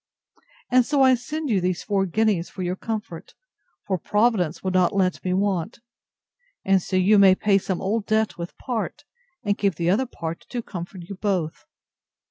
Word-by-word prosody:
And 255 0 +6
so 280 +2 +2
I 260 -1 +6
send 295 +3 -3
you 195 -4 +2
these 180 -1 -1
four 195 -2 0
guineas 205 -2 +1
for 185 - -6
your 180 +1 -1
comfort; 215 -5 -6 0.5
for 190 -3 -1
Providence 210 -5 +1
will 190 - -1
not 185 +1 +2
let 185 -2 +1
me 185 - -1
want: 195 +1 -1 0.9
And 190 -1 +4
so 185 - -4
you 195 +3 +5
may 190 -1 +7
pay 200 0 +3
some 190 -1 -3
old 210 +2 -1
debt 220 0 +1
with 170 0 -7
part, 245 - -4 0.4
and 205 -2 0
keep 200 -4 +1
the 170 +2 +1
other 250 +7 +1
part 165 -7 -6
to 240 -2 -4
comfort 175 -1 -7
you 200 - -6
both. 175 - -2
195 Hz, 180 wpm, -24 LUFS, 180-220 Hz, 0.9 s, may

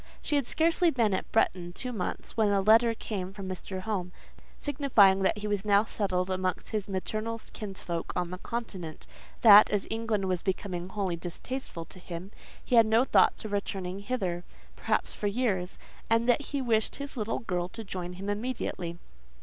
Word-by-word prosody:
She 300 - 0
had 280 -4 +1
scarcely 335 +2 +3
been 230 -8 +2
at 190 - -3
Bretton 175 -5 +1
two 250 +6 -3
months, 185 -5 -4
when 220 -2 +3
a 200 -1 +3
letter 225 +3 +5
came 190 -4 -4
from 195 -2 -7
Mr. 185 0 -5
Home, 185 -3 -3 0.5
signifying 245 -10 +4
that 195 - +2
he 210 - -5
was 205 -2 -1
now 205 -1 +4
settled 190 -4 -1
amongst 185 0 -2
his 210 -2 -2
maternal 215 +4 -3
kinsfolk 185 -5 -4
on 180 -1 -1
the 180 - -6
Continent; 190 -10 -5 0.4
that, 210 -2 +9
as 205 -2 +1
England 225 -3 -1
was 185 -2 0
become 185 -2 -3
wholly 190 -3 -2
distasteful 175 +2 -5
to 185 - -12
him, 180 +2 -7 0.3
he 245 - +3
had 225 -1 +7
no 225 +3 +4
thoughts - - +3
of 215 - -5
returning 195 -2 -3
hither, 195 -6 -2 0.3
perhaps, - - 0
for 205 - -2
years; 200 -5 -1 0.3
and 230 +1 +3
that 250 +3 +3
he 280 -2 -2
wished 220 -3 +1
his 280 0 -6
little 220 -2 -1
girl 180 -4 -2
to 225 - -7
join 180 -3 -5
him 190 +2 -7
immediately. 205 -6 -3
205 Hz, 180 wpm, -29 LUFS, 185-230 Hz, 0.5 s, that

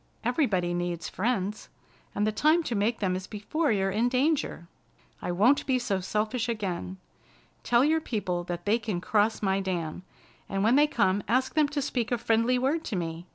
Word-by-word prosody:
"Everybody 215 - +1
needs 175 -1 -3
friends, 210 -1 -2 0.5
and 205 - +1
the 215 - +1
time 310 +10 +3
to 250 - -3
make 220 +2 0
them 185 -2 +1
is 185 0 -5
before 265 +8 -1
you're 195 -2 +1
in 225 +5 +1
danger. 260 - 0 0.5
I - - -2
won't 220 +11 +3
be 260 -2 +3
so 205 -6 -1
selfish 215 +5 -1
again. 190 -4 -3 0.6
Tell 245 +2 +3
your 320 +1 +2
people 185 - -2
that 175 0 -5
they 215 +3 +2
can 210 -5 -3
cross 210 +4 +1
my 195 0 +2
dam, 180 -4 -3 0.5
and 195 0 -1
when 230 +4 +4
they 295 +1 +5
come 200 -9 +1
ask 255 +4 +1
them 305 -1 +3
to 285 -1 -2
speak 245 -3 -2
a 245 - +2
friendly 230 +2 +2
word 280 +6 0
to 220 - -3
me. 170 0 -4
215 Hz, 190 wpm, -28 LUFS, 185-250 Hz, 0.6 s, they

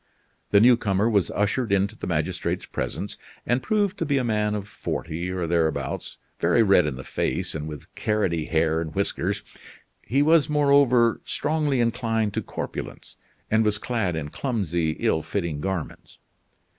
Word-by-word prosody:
The 100 - +6
newcomer 110 -3 +4
was 100 -7 +2
ushered 105 +3 0
into 100 0 +1
the - - -6
magistrate's - - -1
presence - - -4 0.3
and 120 +2 +1
proved 205 -2 0
to - - 0
be 140 -1 +2
a 130 - +1
man 105 -2 0
of 100 -1 -4
forty 85 -3 -4
or 90 -2 -2
thereabouts, 80 -1 -1 0.2
very 115 - +4
red 95 -6 +5
in 70 - -3
the 65 - -8
face - - -2
and 75 -1 -4
with 75 -2 -8
carroty 90 -7 0
hair 80 -1 +1
and 80 +1 -6
whiskers. 100 0 -1 0.6
He 135 +6 +1
was, 160 0 +4
moreover, 140 -5 +4
strongly 150 -4 0
inclined 115 -3 0
to - - -1
corpulence, - - -7 0.4
and 110 +1 +4
was 105 -1 +1
clad 105 -6 -1
in 75 -2 -4
clumsy, 85 - -1
ill 80 - +1
fitting 85 -5 -3
garments. 95 -3 -5
105 Hz, 155 wpm, -25 LUFS, 85-120 Hz, 0.6 s, The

